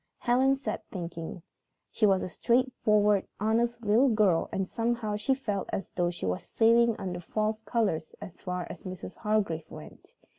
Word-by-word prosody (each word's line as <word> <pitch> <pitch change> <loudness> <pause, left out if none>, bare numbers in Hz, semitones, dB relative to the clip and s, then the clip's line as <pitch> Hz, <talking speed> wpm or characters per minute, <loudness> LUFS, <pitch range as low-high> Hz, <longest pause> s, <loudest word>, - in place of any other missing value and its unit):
Helen 260 +2 +3
sat 255 -6 -4
thinking. 170 -2 -6 0.5
She 215 - +3
was 190 -2 +3
a - - -2
straightforward, 210 -2 +2
honest 235 +2 0
little 230 +6 +5
girl, 210 -7 +3
and 195 -1 -1
somehow 230 -1 -1
she 210 +6 +1
felt 205 -7 -3
as 195 - -4
though 175 -1 0
she 175 - -5
was 90 0 -1
sailing 230 0 +3
under 180 -2 -4
false 215 +4 -2
colors 200 -9 -1
as 175 - -10
far 180 -1 -3
as - - -10
Mrs. 185 -1 -8
Hargrave 205 -7 -1
went. - - -12
210 Hz, 160 wpm, -29 LUFS, 180-235 Hz, 0.5 s, little